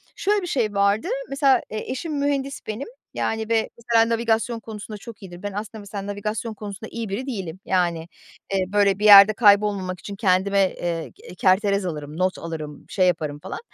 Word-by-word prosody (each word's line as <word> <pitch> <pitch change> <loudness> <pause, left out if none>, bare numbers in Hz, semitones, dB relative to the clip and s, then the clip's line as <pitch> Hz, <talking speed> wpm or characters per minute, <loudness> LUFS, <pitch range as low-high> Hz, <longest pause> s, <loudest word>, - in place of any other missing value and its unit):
şöyle 410 +1 +1
bir 355 - -5
şey 230 -10 0
vardı. 200 - +2 0.2
Mesela, 275 -1 +3
eee, 215 +3 -5
eşim 295 +2 -3
mühendis 275 -1 -1
benim. 220 - -4 0.3
Yani 220 0 -2
ve 225 -1 +1
mesela 230 -1 +2
navigasyon 230 0 0
konusunda 215 -1 -8
çok 215 0 -11
iyidir. 175 0 -10
Ben 205 - -3
aslında 215 +1 -6
mesela 200 0 -7
navigasyon 210 +2 -3
konusunda 205 0 -8
iyi 230 -3 -4
biri 210 +7 -3
değilim. 190 -7 -5
Yani, 175 -3 0 0.5
eee, 190 -1 +1
böyle, 200 0 +2
bir 210 - -1
yerde 205 +1 +10
kaybolmamak 200 -4 +3
için 200 - -7
kendime, 195 0 +2
eee, 170 -2 -3
ge 425 - -20
eee, - - -10
kerterez 200 0 +2
alırım, 150 -2 -5
not 185 0 0
alırım, 155 -3 -7
şey 185 -2 +2
yaparım 155 -4 -1
falan. - - -7
205 Hz, 185 wpm, -23 LUFS, 185-225 Hz, 0.5 s, yerde